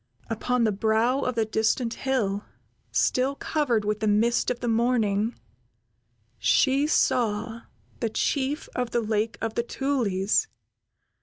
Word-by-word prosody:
Upon 245 Hz, +2 st, 0 dB
the 220 Hz, -, +3 dB
brow 220 Hz, +5 st, +1 dB
of 255 Hz, -3 st, -1 dB
the 225 Hz, -1 st, +1 dB
distant 220 Hz, +2 st, 0 dB
hill, 215 Hz, -7 st, -1 dB, 0.5 s
still 260 Hz, +2 st, +1 dB
covered 255 Hz, -9 st, 0 dB
with 210 Hz, 0 st, -1 dB
the 215 Hz, -, -1 dB
mist 225 Hz, +3 st, +2 dB
of 250 Hz, -, -2 dB
the 245 Hz, -, -3 dB
morning, 225 Hz, -2 st, +1 dB, 1.0 s
she 275 Hz, -, +3 dB
saw 230 Hz, -6 st, +1 dB, 0.4 s
the 230 Hz, -, -1 dB
Chief 275 Hz, +6 st, -1 dB
of 250 Hz, -1 st, -1 dB
the 235 Hz, -, 0 dB
Lake 220 Hz, 0 st, -1 dB
of 225 Hz, -1 st, -2 dB
the -, -, 0 dB
Tulies. 240 Hz, -, 0 dB
230 Hz, 135 wpm, -26 LUFS, 215-255 Hz, 1.0 s, the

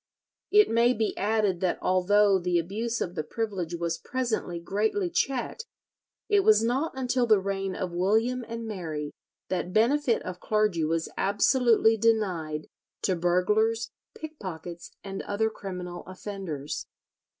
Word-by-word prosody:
It 420 Hz, 0 st, +6 dB
may 235 Hz, +2 st, +3 dB
be 220 Hz, -1 st, -1 dB
added 205 Hz, -3 st, +1 dB
that 185 Hz, -1 st, 0 dB
although 195 Hz, +2 st, +3 dB
the 175 Hz, 0 st, +1 dB
abuse 220 Hz, +7 st, -2 dB
of 175 Hz, -, -2 dB
the 165 Hz, -, -2 dB
privilege 190 Hz, -4 st, -3 dB
was 170 Hz, -1 st, -2 dB
presently 235 Hz, -9 st, -2 dB
greatly 220 Hz, -, -1 dB
checked, 305 Hz, -, -1 dB, 0.6 s
it 415 Hz, -1 st, +4 dB
was 425 Hz, -, +5 dB
not 260 Hz, +7 st, 0 dB
until 250 Hz, -1 st, 0 dB
the 215 Hz, -3 st, +5 dB
reign 195 Hz, -1 st, -2 dB
of 185 Hz, -2 st, -3 dB
William 220 Hz, +8 st, +1 dB
and 230 Hz, 0 st, -5 dB
Mary 160 Hz, -8 st, -4 dB, 0.4 s
that 180 Hz, -1 st, -2 dB
benefit 245 Hz, +3 st, +3 dB
of 185 Hz, -1 st, -6 dB
clergy 210 Hz, -6 st, +1 dB
was 165 Hz, +1 st, 0 dB
absolutely 225 Hz, +2 st, +3 dB
denied 185 Hz, -9 st, 0 dB, 0.4 s
to 185 Hz, -, +2 dB
burglars, 210 Hz, +7 st, +1 dB, 0.2 s
pickpockets, 180 Hz, -, -7 dB
and 195 Hz, -1 st, -5 dB
other 220 Hz, +2 st, -1 dB
criminal 180 Hz, -4 st, -6 dB
offenders. 185 Hz, -6 st, -5 dB
205 Hz, 135 wpm, -27 LUFS, 180-230 Hz, 0.6 s, It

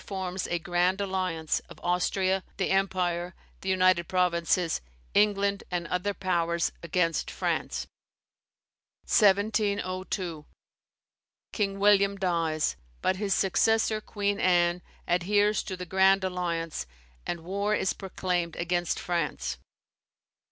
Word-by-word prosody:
forms 190 Hz, -1 st, -4 dB
a 175 Hz, -, +1 dB
"Grand 175 Hz, +3 st, +1 dB
Alliance" 185 Hz, -5 st, -1 dB
of -, -, -12 dB
Austria, 185 Hz, +2 st, +1 dB
the 190 Hz, -, 0 dB
Empire, 180 Hz, -2 st, 0 dB, 0.3 s
the 190 Hz, -, -3 dB
United 185 Hz, -2 st, +3 dB
Provinces, 175 Hz, -1 st, +1 dB, 0.3 s
England, 200 Hz, -1 st, +2 dB
and 175 Hz, -2 st, -2 dB
other 195 Hz, +3 st, -1 dB
powers, 170 Hz, -3 st, 0 dB
against 170 Hz, 0 st, 0 dB
France. -, -, -2 dB, 1.2 s
1702. 195 Hz, -5 st, +1 dB, 1.1 s
King 200 Hz, -2 st, -1 dB
William 200 Hz, -1 st, +4 dB
dies; 165 Hz, -4 st, 0 dB, 0.3 s
but 185 Hz, -, +2 dB
his 200 Hz, -1 st, 0 dB
successor, 215 Hz, +2 st, +2 dB
Queen 205 Hz, -1 st, -2 dB
Anne, 175 Hz, -1 st, +3 dB, 0.3 s
adheres 205 Hz, +4 st, +2 dB
to 185 Hz, -, -6 dB
the 180 Hz, -, -6 dB
Grand 190 Hz, +2 st, +4 dB
Alliance, 170 Hz, -, -2 dB, 0.4 s
and 170 Hz, -, -3 dB
war 200 Hz, +5 st, -1 dB
is 190 Hz, -, 0 dB
proclaimed 180 Hz, -3 st, -2 dB
against 175 Hz, 0 st, -1 dB
France. 150 Hz, -, -2 dB
185 Hz, 110 wpm, -28 LUFS, 175-195 Hz, 1.2 s, William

